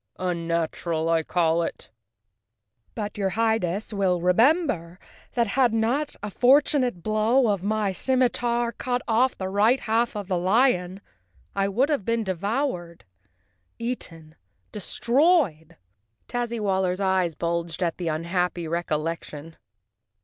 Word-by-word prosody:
Unnatural, 170 -2 -2
I 165 -1 +3
call 165 0 +1
it." 165 - -5 1.0
"But, 210 -2 -5
your 195 -1 +1
Highness 220 -3 0
will 190 -3 +1
remember 180 - +2 0.4
that 235 -1 +2
had 240 +1 +2
not 250 +7 0
a 210 - -4
fortunate 255 - +3
blow 220 +4 +2
of 200 -3 0
my 210 0 0
scimitar 240 +2 +1
cut 250 +1 -3
off 245 +3 +2
the 190 - -3
right 210 +7 +3
half 230 +1 0
of 205 -2 -5
the 185 -2 0
lion 190 -2 +2 0.5
I 195 0 +1
would 245 +9 +1
have 290 -9 0
been 230 +2 0
devoured, 190 - -3 0.7
eaten, 165 -10 -5 0.4
destroyed!" 235 - +1 0.5
Tazzywaller's 205 -6 -1
eyes 190 -4 +1
bulged 170 +1 -2
at 170 0 -2
the 175 - -3
unhappy 170 +2 -1
recollec¬ 165 0 -2
tion. 155 +2 -10
200 Hz, 120 wpm, -25 LUFS, 170-235 Hz, 1.0 s, I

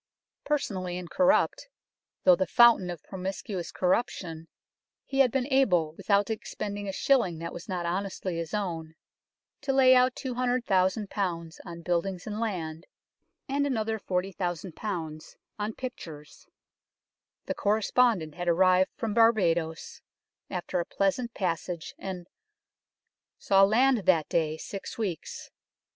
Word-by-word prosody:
Personally 185 -12 -1
incorrupt, 270 - +1 0.5
though 180 - +7
the 190 0 -1
fountain 235 -6 +6
of 175 -4 -6
promiscuous 190 -1 -5
corruption, 180 -4 -1 0.6
he 270 - -3
had 265 -2 +6
been 260 0 0
able, 180 -13 +3
without 200 +5 +1
expending 205 -2 -5
a - - -1
shilling 195 -6 +2
that 170 +1 -6
was 175 - -9
not 180 -2 -2
honestly 185 0 -3
his 165 -1 -4
own, 165 -6 -3 0.7
to 285 -1 -1
lay 265 -1 +6
out 255 0 +4
200,000 240 -6 0 0.6
on 170 -2 -8
buildings 180 +1 -1
and 215 0 -4
land, 170 -7 -3 0.6
and 285 +1 0
another 220 -4 -1
40,000 180 -2 -3 0.9
on 210 +1 -2
pictures. 160 - -8 1.0
The - - -2
correspondent 210 -5 +2
had 175 +1 -5
arrived 185 +2 +4
from 225 -3 -2
Barbadoes, 175 -8 +2 0.5
after 180 0 -2
a 170 - -1
pleasant 230 +5 -1
passage, 170 -2 -3
and 180 -2 -6 0.6
" - - -61
saw 195 0 +4
land 245 +5 +4
that 165 -5 +4
day 160 -2 0
six 195 +4 -7
weeks." 195 -8 -4
190 Hz, 125 wpm, -28 LUFS, 175-230 Hz, 1.0 s, though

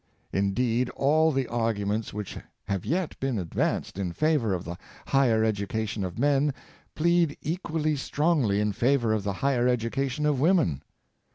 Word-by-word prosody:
Indeed, 115 +5 +1
all 155 +3 +3
the 135 -3 -1
arguments 110 -2 -1
which 105 -1 -6 0.3
have 100 -3 -2
yet 175 +1 -1
been 135 -3 -1
advanced 90 +1 -2
in 90 -3 -2
favor 150 - +1
of 90 -2 -1
the 85 +2 -5 0.3
higher 120 -5 +3
<j - - +3
education 105 0 -2
of 90 -2 -5
men 140 +1 +2 0.4
plead 170 -1 +2
equally 155 -2 -1
strongly 140 -7 +1
in 105 0 +1
favor 120 +1 +2
of 110 - 0
the 100 0 -1
higher 125 -3 +2
education 125 +4 -1
of 145 -3 +2
women. 150 - +2
125 Hz, 155 wpm, -27 LUFS, 105-145 Hz, 0.4 s, all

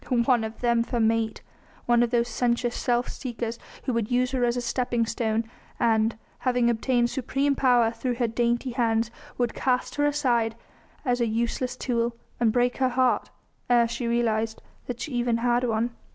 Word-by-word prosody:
One 240 -3 +3
of 220 0 -6
them 235 -1 +3
for 240 +1 -2
mate! 225 0 +1 0.4
One 240 0 +4
of 240 - +2
those 240 0 +1
sensuous 240 +1 0
self 245 -1 0
seekers 235 -2 -5 0.2
who 255 - -1
would 230 -2 -1
use 250 0 +1
her 260 -2 0
as 240 0 +1
a - - +1
stepping 240 -1 0
stone, 225 -1 -1 0.4
and, 225 -1 +2 0.2
having 245 -2 +2
obtained 240 +1 +1
supreme 275 +2 0
power 245 -4 +4
through 245 +1 -2
her 240 -1 0
dainty 240 +2 0
hands, 230 -2 +1 0.3
would 245 -2 0
cast 255 -1 0
her 290 - +3
aside 240 -6 +1 0.5
as 245 -1 +1
a 235 - +2
useless 235 +3 -1
tool 235 -2 -1 0.2
and 235 -2 +3
break 245 +1 +1
her 260 -1 +2
heart 255 0 +1 0.4
ere 240 -1 +5
she 235 +1 -3
realised 225 -2 0 0.4
even 245 -5 0
that 230 - -3
she - - 0
had 245 +1 +2
one. 230 +1 0
240 Hz, 180 wpm, -26 LUFS, 230-250 Hz, 0.5 s, ere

